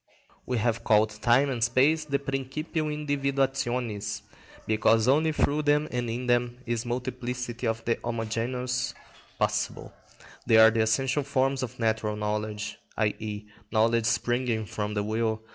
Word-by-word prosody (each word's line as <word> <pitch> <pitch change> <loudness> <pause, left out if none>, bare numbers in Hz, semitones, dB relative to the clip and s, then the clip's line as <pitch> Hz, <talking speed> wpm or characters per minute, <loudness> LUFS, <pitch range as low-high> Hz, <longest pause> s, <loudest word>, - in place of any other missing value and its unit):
We 125 - 0
have 115 0 0
called 110 0 +4
time 130 +5 +4
and 120 -3 -1
space 140 +7 +3
the 140 -2 0
principium 140 +4 -3
individuationis, 135 -7 -1 0.4
because 110 +1 +3
only 155 +4 +4
through 150 0 +1
them 150 0 +2
and 120 -1 -2
in 120 +2 -3
them 120 0 +1
is 120 0 -2
multiplicity 125 0 -3
of 115 0 -2
the 115 - +1
homogeneous 120 +2 -2 0.4
possible. - - -1 0.5
They 115 - +6
are 110 0 +8
the 115 0 +1
essential 135 +6 +1
forms 135 0 0
of 125 -3 -5
natural 110 -2 0
knowledge, 105 0 -3 0.2
i.e., 105 -1 -2 0.3
knowledge 115 +1 +3
springing 120 -1 0
from 105 +2 -4
the 105 - 0
will. 110 +1 -1
120 Hz, 140 wpm, -27 LUFS, 110-135 Hz, 0.5 s, are